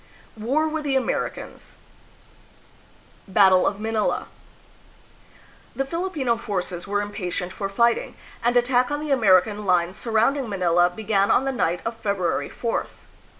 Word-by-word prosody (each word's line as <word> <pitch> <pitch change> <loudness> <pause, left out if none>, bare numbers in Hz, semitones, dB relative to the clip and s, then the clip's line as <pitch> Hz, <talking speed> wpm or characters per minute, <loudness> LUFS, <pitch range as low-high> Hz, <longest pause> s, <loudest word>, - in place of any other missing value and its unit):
War 265 +9 0
with 315 0 -3
the 280 -2 0
Americans. 265 - -3 1.5
Battle 190 -2 +5
of 200 - -2
Manila. 220 0 -1 1.5
The 270 - -1
Filipino 310 -7 -1
forces 185 -5 -4
were 205 +1 0
impatient 185 -3 -4
for 195 -1 -4
fighting, 235 +4 +1 0.3
and 240 +1 +3
attack 245 0 +2
on 290 0 -2
the 300 -1 -4
American 210 -4 +3
lines 180 -1 +1
surrounding 235 +3 +1
Manila 175 -3 +2
began 200 +1 0
on 265 - +3
the 270 - 0
night 175 -9 -1
of 225 +1 -2
February 200 -6 -1
4th. 230 -1 -4
220 Hz, 130 wpm, -23 LUFS, 190-250 Hz, 1.5 s, Battle